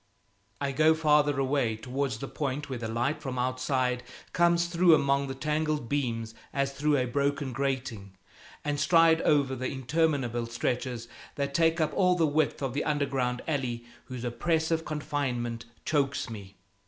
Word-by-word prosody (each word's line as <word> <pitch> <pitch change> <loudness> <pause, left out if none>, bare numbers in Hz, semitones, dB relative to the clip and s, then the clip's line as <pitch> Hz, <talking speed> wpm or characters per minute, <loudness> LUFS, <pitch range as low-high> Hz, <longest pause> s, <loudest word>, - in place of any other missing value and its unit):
I 140 - -1
go 155 +3 +4
farther 150 -2 +3
away, 135 -4 +1
towards 130 +1 -3
the 135 - -6
point 145 0 -3
where 125 - -3
the 115 - -3
light 120 +7 -1
from 130 -3 -4
outside 130 0 0 0.3
comes 170 0 +3
through 170 -1 +5
among 140 -1 +1
the 135 - -5
tangled 150 -1 -1
beams 115 -6 -1 0.2
as 140 -1 0
through 150 +1 +2
a 130 - +1
broken 140 +1 -1
grating, 125 -7 -3 0.5
and 145 -1 -1
stride 165 +1 +5
over 140 -3 +2
the 130 +1 -3
interminable 130 -4 0
stretchers 120 0 -2 0.3
that 140 -1 -2
take 165 +1 +3
up 155 - +1
all 180 -2 +3
the 165 -2 +3
width 150 -1 0
of 130 -3 -2
the 145 - -1
underground 135 -4 -1
alley 125 -6 -2 0.2
whose 125 -2 -7
oppressive 160 +6 0
confinement 140 -6 -3 0.2
chokes 140 -5 0
me. 100 -3 -9
140 Hz, 155 wpm, -28 LUFS, 125-150 Hz, 0.5 s, through